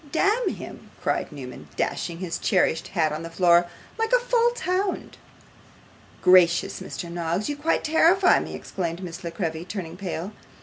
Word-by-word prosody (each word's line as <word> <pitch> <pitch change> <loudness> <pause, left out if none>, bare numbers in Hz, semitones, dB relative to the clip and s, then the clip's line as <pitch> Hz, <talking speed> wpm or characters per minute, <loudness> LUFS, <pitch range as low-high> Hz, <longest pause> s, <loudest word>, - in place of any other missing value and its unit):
'Damn 410 +7 +2
him!' - - -8
cried - - -1
Newman, 125 - -9
dashing 170 - -2
his 175 -2 -4
cherished 175 -5 +1
hat 160 -5 +1
on 155 +1 -4
the 165 - -6
floor; 175 0 +4 0.3
'like 450 +1 0
a - - +7
false 480 -1 +1
hound.' 370 +2 -2 1.0
'Gracious, 180 -2 +5
Mr. 175 - -6
Noggs, 170 +3 -2
you 290 - -1
quite 300 +3 0
terrify 345 +4 +5
me!' - - -6
exclaimed 175 -1 -4
Miss 175 +1 -7
La 170 - -3
Creevy, 165 -2 -3
turning 180 -3 -6
pale. 185 0 -4
180 Hz, 160 wpm, -25 LUFS, -, 1.0 s, a